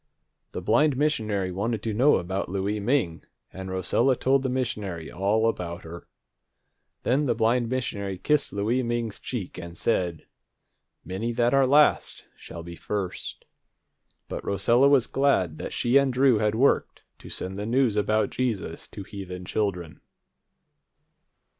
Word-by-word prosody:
The - - -5
blind 135 +5 +3
missionary 110 -10 0
wanted 105 +4 -2
to 110 - -2
know 130 +8 +5
about 95 +1 -2
Louie 100 +3 -1
Ming, 105 -7 0 0.3
and 95 0 -7
Rosella 95 +8 +2
told 135 +2 +2
the 130 - -1
missionary 105 -10 -3
all 105 +4 +1
about 85 -6 -3
her. 85 +1 -10 1.0
Then 140 +4 +2
the 120 -4 +1
blind 115 +1 +2
missionary 105 -6 -3
kissed 150 +8 +1
Louie 110 +6 0
Ming's 120 -3 -2
cheek, 105 -8 -5
and 85 -1 -8
said, 90 -7 -1 0.8
"Many 100 +6 -3
that 120 +1 +2
are 135 -1 +4
last 150 +2 +3
shall 85 - -9
be 85 0 -8
first." 95 +2 -5 0.8
But - - -5
Rosella 120 +7 +3
was 135 -4 +4
glad 95 - +1
that - - -5
she 125 +3 +2
and 140 -1 +3
Drew 125 -3 +4
had 105 0 +1
worked 135 +5 +1 0.2
to - - -11
send 95 +1 -4
the 105 +2 -4
news 125 -2 +2
about 105 0 +1
Jesus 110 -10 -3
to 100 - -9
heathen 90 -2 -8
children. 90 -5 -3
110 Hz, 145 wpm, -26 LUFS, 95-125 Hz, 1.0 s, know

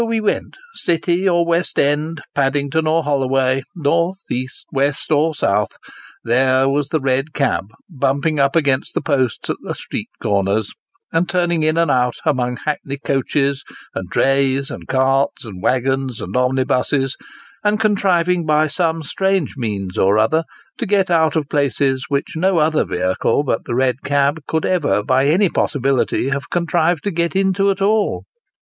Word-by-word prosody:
105 225 -1 -1
we - - +4
went, - - -9 0.2
City 175 - +1
or 170 -1 +2
West 170 +1 0
End, 150 +2 0
Paddington 140 +3 0
or 160 +1 +2
Holloway, 135 -2 +1
North, 170 +3 +1
East, 130 +1 -4
West, 140 +2 -1
or 155 +1 +2
South, 100 -4 0 0.5
there 130 +2 +3
was 140 +1 0
the 160 - 0
red 135 +2 0
cab, 110 -11 0 0.2
bumping 140 0 0
up 140 +2 +2
against 140 -5 +1
the - - 0
posts 135 -5 -1
at - - -4
the - - -5
street - - -6
corners, 100 +1 0 0.4
and 170 +2 +1
turning 175 -2 +1
in 155 +1 +2
and 165 -3 +2
out, 125 -2 +1
among 125 -3 0
hackney 140 -2 -3
coaches, 140 0 0 0.3
and 95 -2 -5
drays, 135 +2 +1
and - - -8
carts, 135 0 +1
and 95 -5 -9
waggons, 130 0 0
and - - -6
omnibuses, 130 +1 +1 0.5
and 210 +1 +1
contriving 180 -5 +2
by 155 0 +3
some 160 +1 -1
strange 190 +1 0
means 100 -7 -3
or 100 +2 +3
other, 155 +10 +2 0.3
to - - -2
get 195 -2 +2
out 160 -1 +3
of 155 -3 0
places 135 -2 0
which 140 +2 -2
no 185 +3 +1
other 155 0 +2
vehicle 95 +9 0
but 120 -5 -2
the 120 - -3
red 130 -1 +1
cab 145 +2 +1
could 160 -1 -1
ever 140 - +1
by 130 +4 +2
any 185 +7 +4
possibility 135 -4 0
have 140 0 -3
contrived 170 -1 0
to 205 - -1
get 170 +1 -1
into 195 +1 +2
at 195 0 0
all. 210 +1 +1
145 Hz, 165 wpm, -19 LUFS, 130-165 Hz, 0.5 s, we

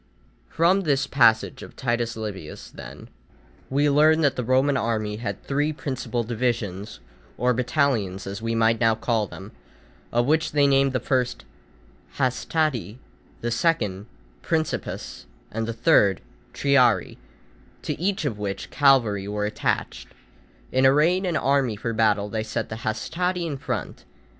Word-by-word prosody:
From 180 +4 +3
this 140 -6 +1
passage 120 -5 +3
of - - -11
Titus 120 -2 -1
Livius, 100 -8 -7
then, - - -10 0.6
we 145 +2 +2
learn 155 +3 +4
that 145 -3 +2
the 125 - -2
Roman 130 +4 +2
army 110 -4 -1
had 100 -3 -5
three 145 +2 0
principal 130 -5 -3
divisions, 110 - -3 0.4
or 125 +2 +2
battalions 120 -7 0
as 100 +2 -6
we 115 0 -2
might 115 0 +3
now 115 -1 +3
call 110 -2 0
them, 95 +2 -10 0.6
of 120 0 +2
which 155 +3 +1
they 145 -1 +4
named 135 -1 +3
the 130 - +1
first 125 0 -1 0.7
hastati, 130 - -1 0.4
the 120 - -2
second 115 - 0 0.3
principes, 160 - -3 0.2
and 115 0 -3
the - - -1
third 115 - +3 0.3
triarii, 125 -9 +2 0.6
to - - -2
each 190 -3 0
of 110 -7 -2
which 100 -2 -4
cavalry 115 -9 +3
were 105 0 -2
attached. 105 - -2 0.6
In 130 +1 +2
arraying 160 +8 +4
an 170 -3 0
army 135 -5 +1
for 115 +3 -3
battle 105 -2 +2
they 110 +1 -3
set 110 +1 -3
the 110 - -5
hastati 175 +11 -2
in 155 -4 -3
front. - - -4
120 Hz, 145 wpm, -24 LUFS, 110-140 Hz, 0.7 s, learn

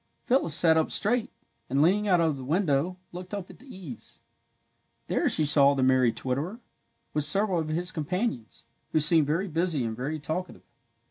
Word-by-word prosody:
Phyllis 245 - +2
sat 160 -2 +4
up 160 - +1
straight, 235 +2 +2 0.4
and, 135 +2 0
leaning 205 +5 +2
out 180 -3 +3
of 160 -3 +1
the 135 - -9
window, 160 +2 0
looked 180 +3 -8
up 195 -3 -7
at - - -18
the 270 - -18
eaves. 180 - -11 0.9
There - - 0
she 155 - +4
saw 140 -1 +5
the 135 - 0
merry 130 -2 +3
twitterer, 145 - -4 0.5
with 150 - 0
several 195 +3 +2
of 160 - -3
his 175 +4 -2
companions, 155 - -4 0.3
who 155 - +3
seemed 155 0 +4
very 170 +7 -1
busy 165 -4 -1
and 110 -1 -4
very 140 +6 -4
talkative. 160 +5 -6
160 Hz, 180 wpm, -26 LUFS, 140-185 Hz, 0.9 s, saw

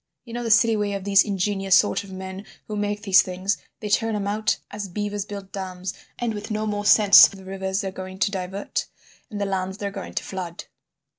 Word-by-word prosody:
You 230 - -10
know 240 - -3
the 235 - -3
silly 225 +1 +5
way 205 -1 -1
of 195 -1 -4
these 200 0 +5
ingenious 195 -1 +1
sort 205 - +3
of 200 - -12
men 190 +1 -7 0.2
who 215 - -4
make 205 0 -2
these 195 -1 +6
things; 185 +1 -2 0.2
they 210 - -4
turn 225 +1 +1
'em 205 -1 -2
out 210 +1 0
as 205 -1 -5
beavers 205 +1 -3
build 200 -2 -8
dams, 185 -1 -5 0.2
and 235 -2 -2
with 210 +1 -6
no 215 0 -1
more 205 -1 -2
sense 205 0 +9
of 200 - -12
the 190 - -13
rivers 190 0 -2
they're 195 - -4
going 185 0 -8
to 200 - +1
divert 190 +1 -3 0.4
and 210 -4 -6
the 200 - 0
lands 190 0 -2
they're 200 -1 -3
going 195 -1 -8
to - - -1
flood! 180 -3 -6
200 Hz, 225 wpm, -24 LUFS, 190-210 Hz, 0.4 s, sense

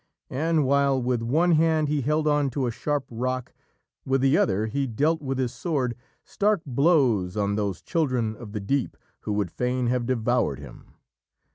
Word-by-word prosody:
And 155 +2 +1
while 140 0 +3
with 125 -1 -1
one 155 +10 +2
hand 160 -1 +3
he 145 -1 0
held 150 +4 0
on 145 -2 +2
to 135 - +1
a 120 - -1
sharp 145 +3 -2
rock, 130 +2 -3 0.5
with 135 0 +1
the 135 +2 +4
other 100 +1 +2
he 135 +5 -2
dealt 150 +8 0
with 135 -2 -3
his 125 -2 -1
sword 130 -3 -2 0.3
stark 205 -4 0
blows 130 - +2
on 100 -1 0
those 100 -3 -2
children 130 -10 0
of 110 -2 -10
the 105 - -4
deep 125 +6 -1 0.2
who 105 - -4
would 100 -5 -1
fain 125 +3 -1
have 125 -1 0
devoured 120 -4 +1
him. - - -13
130 Hz, 175 wpm, -25 LUFS, 115-150 Hz, 0.5 s, the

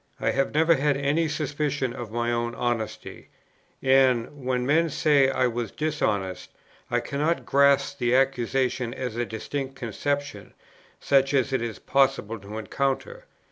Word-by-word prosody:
I - - +1
have 135 0 0
never 160 +2 +4
had 145 -1 +1
any 145 +4 +1
suspicion 145 -3 -2
of 120 -3 -7
my 120 +1 -1
own 120 0 -2
honesty; 120 -3 -4 0.5
and, 130 0 +3
when 125 -1 0
men 160 +4 +3
say 145 -2 +3
that 135 - -2
I 130 - +2
was 120 -2 -2
dishonest, 105 -12 -2 0.4
I - - +1
cannot 150 +4 -1
grasp 140 0 +3
the 120 0 +2
accusation 130 -1 0
as 125 -4 -4
a 120 0 -2
distinct 135 +4 -5
conception, 135 -2 -4 0.4
such 135 0 +2
as 135 0 +1
it 130 - +1
is 115 -2 -4
possible 135 -5 +1
to 100 +2 -8
encounter. 140 - -3
135 Hz, 150 wpm, -25 LUFS, 120-140 Hz, 0.5 s, never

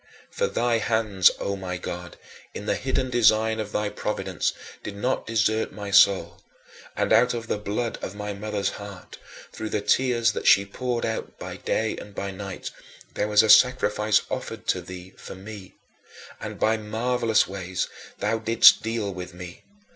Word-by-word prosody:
For 485 - 0
thy 120 - +1
hands, 105 -4 +3
O 100 - -2
my 95 -2 -5
God, 90 0 -7 0.4
in - - -6
the - - +1
hidden 130 -1 -2
design 110 -2 +3
of 105 -1 -4
thy 105 0 -1
providence 95 -4 -2 0.3
did 105 - -7
not 125 +6 -2
desert 110 0 +1
my 100 -1 -6
soul; 100 -1 +4 0.5
and - - +1
out 125 0 +4
of 115 -1 -5
the 105 - -2
blood 105 +3 -3
of 95 - -6
my 105 0 -4
mother's 100 -1 -2
heart, 100 -2 -10 0.3
through 110 - -5
the 105 - -1
tears 120 +1 +2
that - - -4
she 100 - +6
poured 120 +4 -3
out 110 - -4
by - - -7
day 110 -1 -1
and 100 -1 -10
by 100 0 -4
night, 95 0 -7 0.4
there 105 - -1
was 105 0 +5
a - - +1
sacrifice 110 -4 +5
offered - - -5
to - - +1
thee 90 +1 -10
for - - -9
me, 95 0 -10 0.6
and - - -7
by 110 +1 +2
marvelous 115 +1 +1
ways 95 -2 -3 0.3
thou 110 +2 0
didst 115 +1 +6
deal 110 -3 -2
with 90 0 -8
me. 90 0 -9
105 Hz, 170 wpm, -25 LUFS, 100-115 Hz, 0.6 s, she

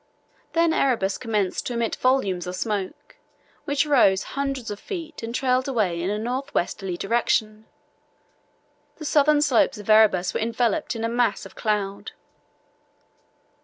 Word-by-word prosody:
Then 335 -1 +3
Erebus 230 -10 +1
commenced 210 -6 -1
to 245 - -3
emit 235 -1 -1
volumes 200 -9 +1
of 180 - -4
smoke, 205 -2 -4 0.5
which 285 +1 +1
rose 210 -10 +4
hundreds 275 -4 -3
of 205 - -6
feet 330 -6 -7
and 230 +1 -5
trailed 255 0 +1
away 205 -10 0
in 180 - -1
a 210 - -1
north 255 +6 -3
westerly 180 0 -2
direction. 215 0 0 1.3
The 310 - -9
southern 295 0 +4
slopes 265 -8 +2
of 205 - -10
Erebus 200 -4 +4
were - - -1
enveloped 235 +5 0
in 225 - -4
a - - +1
mass 230 -4 0
of 195 - -12
cloud." 205 -3 -2
230 Hz, 145 wpm, -24 LUFS, 200-270 Hz, 1.3 s, rose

